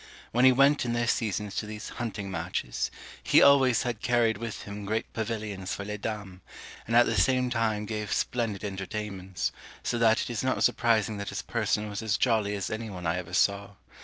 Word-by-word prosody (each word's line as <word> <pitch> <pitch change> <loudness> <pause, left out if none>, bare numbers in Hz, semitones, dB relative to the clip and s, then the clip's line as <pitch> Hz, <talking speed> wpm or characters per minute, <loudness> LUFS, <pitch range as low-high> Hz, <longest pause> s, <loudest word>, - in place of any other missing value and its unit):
When 125 +2 +4
he 130 - +9
went 140 +3 +4
in 120 -1 -1
their 120 0 +1
seasons 105 -3 -1
to 105 - -2
these 105 0 -7
hunting 105 -5 -5
matches, - - -2 0.3
he - - +5
always 135 -4 +5
had 120 -4 -3
carried 115 -3 +2
with 115 -2 -5
him 100 0 -7
great 110 +2 -2
pavilions 105 -4 -3
for 100 - -6
les 105 0 -5
dames, 100 -4 -5 0.5
and 115 - 0
at 120 - +7
the - - 0
same 125 +5 +2
time 110 -3 0
gave 105 -1 -4
splendid 115 -5 -1
entertainments; 95 -1 -4 0.3
so 120 - -1
that 115 -1 +4
it - - -5
is 115 -1 -2
not 130 0 +1
surprising 110 -3 +2
that 100 0 -4
his - - -4
person 105 0 -1
was 105 +1 -5
as 110 -1 0
jolly 110 -4 +1
as 100 - -3
any 110 +1 -4
one 90 -3 -7
I 80 +2 +1
ever 90 -1 -6
saw. 100 +2 +1
110 Hz, 200 wpm, -28 LUFS, 100-115 Hz, 0.5 s, he